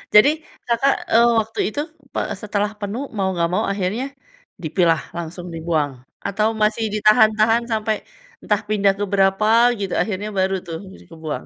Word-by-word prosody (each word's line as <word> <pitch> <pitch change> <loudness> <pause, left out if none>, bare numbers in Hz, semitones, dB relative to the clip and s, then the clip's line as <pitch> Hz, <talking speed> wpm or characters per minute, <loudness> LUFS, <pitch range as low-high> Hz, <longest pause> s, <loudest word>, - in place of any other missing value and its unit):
Jadi 215 +7 +9 0.4
Kakak, 240 +4 +3 0.2
eee, 230 +1 +6
waktu 220 0 -4
itu 285 +7 -2 0.3
pe - - -1 0.2
setelah 210 0 -1
penuh 205 +5 -4 0.2
mau 195 - +1
nggak 170 -1 +1
mau - - +1
akhirnya 200 +5 -1 0.6
dipilah, 165 0 +2 0.2
langsung 170 +1 -6
dibuang? 160 -3 -1 0.4
Atau 210 +2 +1
masih 215 +2 +2
ditahan-tahan 215 +2 +4
sampai 220 0 0 0.5
entah 210 0 +1
pindah 200 -2 +3
ke - - 0
berapa 195 +1 +3 0.3
gitu 195 -2 -3
akhirnya 210 0 -2
baru 190 +1 +2
tuh 165 - -4 0.2
bisa - - -15
kebuang? 160 -2 -5
205 Hz, 150 wpm, -21 LUFS, 180-215 Hz, 0.6 s, Jadi